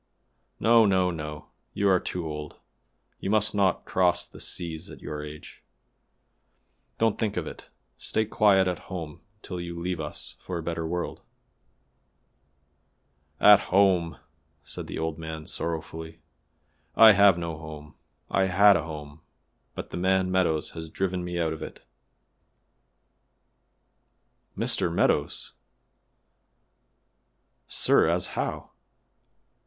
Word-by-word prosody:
No! 115 0 +6
no! 95 -2 +2
no! 75 -2 -7 0.3
you 100 - +1
are 95 -2 +4
too 90 -1 -4
old; 75 -1 -6 0.6
you - - -4
must 110 0 +3
not 100 -2 +1
cross 90 -1 +2
the - - -15
seas 85 -2 -3
at - - -11
your 75 0 -6
age; 75 0 -10 1.4
don't 115 -1 +1
think 105 -3 -1
of 85 - -1
it; - - -10 0.3
stay 110 - 0
quiet 100 -3 +4
at 90 - -2
home 80 -6 -6 0.2
till 90 -2 -5
you 85 0 -6
leave 90 0 -3
us 75 -1 -5
for 90 - -5
a 85 - -5
better 85 0 -3
world." 90 +1 -4 2.2
"At 105 -1 +8
home!" 90 -5 +3 0.5
said - - -7
the - - -6
old 80 0 -3
man 80 -1 -6
sorrowfully; 80 0 -5 0.8
"I 110 -1 +9
have 100 -3 +6
no 85 -2 -4
home. 75 -2 -10 0.3
I 95 - +2
had 100 +2 +6
a 85 - +1
home, 75 -1 -9 0.5
but - - -7
the - - -4
man 95 +1 +1
Meadows 85 -4 +1
has 80 -1 -8
driven 90 +1 -2
me 90 0 -3
out 80 -2 0
of 80 - -9
it." - - -9 2.7
"Mr. 85 - +1
Meadows! 85 - 0
La, - - -44 2.1
sir, - - +3
as - - +1
how?" - - -4
85 Hz, 125 wpm, -26 LUFS, 80-95 Hz, 2.7 s, I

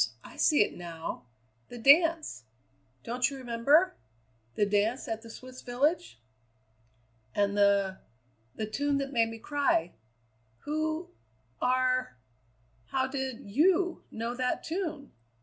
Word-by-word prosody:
I - - -12
see 295 -8 +4
it - - -5
now 165 -7 -7 0.4
the 245 - -9
dance! 310 - +4 0.6
Don't 245 +2 0
you 275 - -7
remember? 260 +8 +3 0.6
The 205 - +3
dance 205 +5 0
at 225 0 -3
the 230 - -12
Swiss 255 +2 -10
village?" 250 - 0 1.2
"And 200 0 +1
the 200 -2 +3 0.6
the 215 - -2
tune 285 +6 0
that 275 0 -3
made 230 -2 +3
me 225 - -7
cry. 225 - 0 0.7
Who 315 +3 -2 0.5
are 255 - +1 0.7
How 260 -1 0
did 265 -2 -4
you 345 - +2
know 230 +2 -4
that 250 0 -1
tune? 320 -5 -4
255 Hz, 120 wpm, -29 LUFS, 220-290 Hz, 1.2 s, see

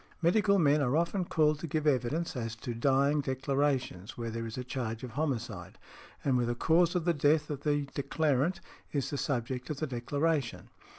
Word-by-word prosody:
Medical 200 +4 +3
men 150 -4 +4
are 135 +2 +2
often 170 +3 0
called 155 -2 +2
to 165 - -5
give 155 0 -1
evidence 145 +4 +1
as 115 -3 -3
to 120 +2 -5
dying 140 +4 +2
declarations 135 -6 -1
where 115 -1 -3
there 115 0 -4
is 110 - -7
a 125 - -3
charge 120 -3 -4
of 125 - -6
homicide, 115 - -3 0.5
and 135 -3 +3
where 120 - +1
the 120 - -1
cause 170 +6 +3
of 175 -2 0
the 170 - +3
death 150 +1 +2
of 140 -2 -4
the 145 -1 +1
declarant 145 +3 0 0.3
is 140 0 -1
the 145 - -2
subject 125 -1 -2
of 150 - -3
the 155 - -1
declaration. 140 +2 -1
140 Hz, 190 wpm, -31 LUFS, 125-155 Hz, 0.5 s, men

